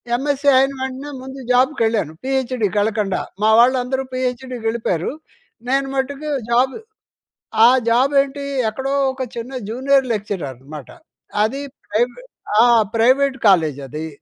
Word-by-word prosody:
MSc 285 Hz, +2 st, -1 dB
అయిన 270 Hz, +1 st, +3 dB
వెంటనే, 265 Hz, +2 st, -5 dB
ముందు 265 Hz, +1 st, -9 dB
జాబ్‌కెళ్ళాను. 230 Hz, -, +1 dB
పీహెచ్‍డీకెళ్ళకండా, 220 Hz, -6 st, 0 dB, 0.2 s
మా 215 Hz, -, +4 dB
వాళ్ళందరూ 255 Hz, +1 st, +2 dB
పీహెచ్‌డికెళ్ళిపోయరు. 240 Hz, -7 st, -2 dB, 0.6 s
నేను 270 Hz, +1 st, +1 dB
మట్టుకు 280 Hz, +3 st, -3 dB, 0.2 s
జాబ్ 255 Hz, +2 st, +2 dB, 0.9 s
ఆ -, -, +9 dB, 0.2 s
జాబేంటి? 275 Hz, +3 st, +2 dB, 0.3 s
ఎక్కడో 265 Hz, +5 st, -3 dB, 0.2 s
ఒక 260 Hz, 0 st, -8 dB
చిన్న 235 Hz, +3 st, -6 dB, 0.2 s
జూనియర్ 265 Hz, +3 st, +2 dB
లెక్చరర్ 205 Hz, -6 st, -3 dB
అనమాట. 145 Hz, -2 st, -10 dB, 0.5 s
అదీ 270 Hz, +6 st, -1 dB, 0.3 s
ప్రెవే 245 Hz, -, -1 dB, 0.4 s
ఆ! -, -, +7 dB, 0.3 s
ప్రైవేట్ 265 Hz, +4 st, +3 dB
కాలేజది. 155 Hz, -4 st, +1 dB
255 Hz, 105 wpm, -19 LUFS, 220-270 Hz, 0.9 s, ఆ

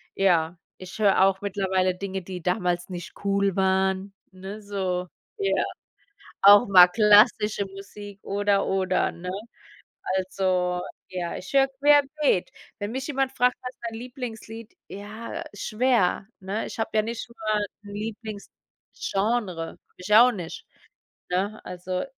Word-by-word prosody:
Ja, 175 Hz, -3 st, +2 dB, 0.2 s
ich 185 Hz, 0 st, -10 dB
höre 200 Hz, -3 st, +4 dB
auch 195 Hz, 0 st, +2 dB
mittlerweile 190 Hz, -2 st, 0 dB
Dinge, 190 Hz, 0 st, -4 dB
die 180 Hz, 0 st, -7 dB
damals 180 Hz, 0 st, -1 dB
nicht 175 Hz, -1 st, -7 dB
cool 200 Hz, -1 st, +1 dB
waren, 190 Hz, 0 st, +1 dB, 0.2 s
ne? 190 Hz, +3 st, -8 dB
So, 190 Hz, -3 st, -2 dB, 0.3 s
ja. 400 Hz, -2 st, +1 dB, 0.8 s
Auch 205 Hz, +3 st, +8 dB
mal 180 Hz, -2 st, +9 dB
klassische 210 Hz, +1 st, +4 dB
Musik 200 Hz, +1 st, -10 dB
oder 200 Hz, 0 st, +1 dB
oder, 190 Hz, -1 st, +1 dB
ne? 180 Hz, +1 st, -7 dB, 0.9 s
Also, 185 Hz, -1 st, 0 dB, 0.3 s
ja, 180 Hz, -2 st, -4 dB
ich 185 Hz, -, -9 dB
höre 270 Hz, 0 st, +5 dB
querbeet. 285 Hz, -4 st, +2 dB, 0.3 s
Wenn 205 Hz, +1 st, -3 dB
mich 265 Hz, +2 st, -4 dB
jemand 270 Hz, -2 st, 0 dB
fragt: 250 Hz, -1 st, +2 dB
„Was 250 Hz, -, -5 dB
ist -, -, -62 dB
dein 225 Hz, -, -8 dB
Lieblingslied?“ 230 Hz, -3 st, -8 dB
Ja, 215 Hz, +3 st, -7 dB
schwer, 215 Hz, -2 st, +1 dB
ne? 195 Hz, +3 st, -3 dB
Ich -, -, -8 dB
habe 225 Hz, -, -1 dB
ja 215 Hz, -, +4 dB
nicht 230 Hz, +1 st, -5 dB
nur 220 Hz, -2 st, -2 dB
'n 205 Hz, -, 0 dB, 0.3 s
Lieblingsgenre, 210 Hz, -2 st, -4 dB
habe -, -, -17 dB, 0.2 s
ich 180 Hz, +3 st, -2 dB
auch 245 Hz, +3 st, +8 dB
nicht, 175 Hz, -7 st, -7 dB, 0.6 s
ne? 195 Hz, +4 st, -1 dB
Also 180 Hz, +1 st, -4 dB
200 Hz, 135 wpm, -25 LUFS, 185-220 Hz, 0.9 s, mal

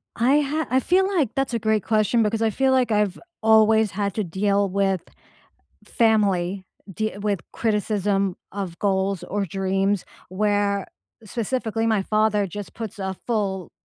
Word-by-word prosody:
I 260 Hz, +5 st, +3 dB
ha 300 Hz, +2 st, -2 dB
I 260 Hz, -, +3 dB
feel 370 Hz, +8 st, +2 dB
like 345 Hz, -, +1 dB
that's 270 Hz, -2 st, -1 dB
a 230 Hz, -, 0 dB
great 220 Hz, -2 st, +1 dB
question 215 Hz, +1 st, +2 dB
because 220 Hz, +1 st, -1 dB
I 225 Hz, -, +3 dB
feel 265 Hz, +5 st, +1 dB
like 255 Hz, -3 st, +2 dB
I've 210 Hz, -3 st, +1 dB, 0.2 s
always 220 Hz, -1 st, +4 dB
had 200 Hz, 0 st, -2 dB
to 215 Hz, -, 0 dB
deal 200 Hz, +3 st, 0 dB
with 195 Hz, -1 st, 0 dB, 0.8 s
family, 200 Hz, -5 st, +1 dB, 0.3 s
de 215 Hz, +2 st, -3 dB
with 200 Hz, -3 st, -1 dB
criticism 205 Hz, -3 st, 0 dB, 0.2 s
of 190 Hz, -4 st, -5 dB
goals 190 Hz, -2 st, 0 dB
or 200 Hz, +2 st, -2 dB
dreams 195 Hz, +2 st, 0 dB, 0.2 s
where 200 Hz, +1 st, 0 dB, 0.4 s
specifically 225 Hz, 0 st, -2 dB
my 220 Hz, -3 st, +2 dB
father 215 Hz, 0 st, +1 dB
just 200 Hz, +2 st, -8 dB
puts 225 Hz, -1 st, -7 dB
a 190 Hz, -1 st, -3 dB
full 195 Hz, -6 st, -1 dB
210 Hz, 150 wpm, -23 LUFS, 195-225 Hz, 0.8 s, always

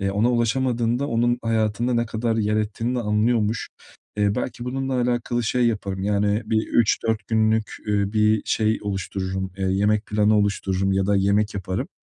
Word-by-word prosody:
eee, 100 Hz, 0 st, 0 dB
ona 105 Hz, +5 st, +2 dB
ulaşamadığında 120 Hz, +1 st, 0 dB
onun 120 Hz, -1 st, +1 dB
hayatında 115 Hz, +1 st, 0 dB
ne 120 Hz, 0 st, +1 dB
kadar 110 Hz, +1 st, -1 dB
yer 105 Hz, -1 st, +1 dB
ettiğini 110 Hz, +3 st, -2 dB
de 125 Hz, -, 0 dB
anlıyormuş. 110 Hz, +1 st, 0 dB, 0.5 s
Eee, 105 Hz, -1 st, +1 dB
belki 120 Hz, 0 st, -4 dB
bununla 135 Hz, +1 st, -2 dB
alakalı 120 Hz, 0 st, 0 dB
şey 120 Hz, +2 st, +1 dB
yaparım 100 Hz, -4 st, -2 dB
yani 105 Hz, +2 st, +1 dB
bir 110 Hz, 0 st, 0 dB
3-4 110 Hz, -1 st, +1 dB
günlük, 110 Hz, -1 st, +1 dB
üüü, 100 Hz, -1 st, 0 dB
bir 110 Hz, 0 st, +3 dB
şey 110 Hz, 0 st, +1 dB
oluştururum, 95 Hz, -1 st, -3 dB
eee, 95 Hz, -, -3 dB
yemek 105 Hz, +3 st, +1 dB
planı 105 Hz, +1 st, +2 dB
oluştururum 95 Hz, -1 st, 0 dB
ya 95 Hz, 0 st, +1 dB
da 100 Hz, 0 st, +2 dB
yemek 100 Hz, +2 st, +1 dB
yaparım 95 Hz, -1 st, -3 dB
110 Hz, 165 wpm, -23 LUFS, 100-115 Hz, 0.5 s, bir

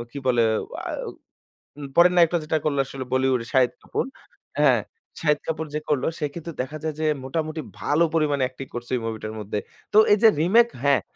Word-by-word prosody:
কি 140 Hz, -, -7 dB
বলে 120 Hz, -2 st, +3 dB, 0.5 s
আও -, -, -4 dB, 0.7 s
উম 145 Hz, -1 st, -6 dB
পরের 175 Hz, +1 st, +6 dB
নায়কটা 175 Hz, 0 st, +5 dB
যেটা 160 Hz, +1 st, 0 dB
করলো 145 Hz, -2 st, +1 dB
আসলে 130 Hz, -1 st, -7 dB
বলিউডের 130 Hz, -2 st, +1 dB
শাহিদ 125 Hz, -2 st, +4 dB
কাপুর। -, -, -2 dB, 0.6 s
হ্যাঁ, -, -, +5 dB, 0.4 s
শাহিদ 150 Hz, -2 st, +2 dB
কাপুর 160 Hz, 0 st, -2 dB
যে 150 Hz, -, -1 dB
করলো 145 Hz, -4 st, +1 dB
সে 150 Hz, -, -1 dB
কিন্তু 170 Hz, 0 st, -6 dB
দেখা 145 Hz, +4 st, -5 dB
যায় 155 Hz, -1 st, -2 dB
যে 160 Hz, -, 0 dB, 0.2 s
মোটামুটি 155 Hz, +3 st, -3 dB, 0.2 s
ভালো 150 Hz, +3 st, +2 dB
পরিমাণে 145 Hz, -4 st, +1 dB
acting 130 Hz, +1 st, -10 dB
করছে 120 Hz, 0 st, -6 dB
ওই 125 Hz, -, -2 dB
মুভিটার 110 Hz, -1 st, -4 dB
মধ্যে। 105 Hz, 0 st, -3 dB, 0.3 s
তো -, -, +4 dB
এই 205 Hz, -, +7 dB
যে -, -, +10 dB
রিমেক 230 Hz, +8 st, +5 dB, 0.2 s
হ্যাঁ। 140 Hz, -5 st, +4 dB
145 Hz, 190 wpm, -24 LUFS, 130-160 Hz, 0.7 s, যে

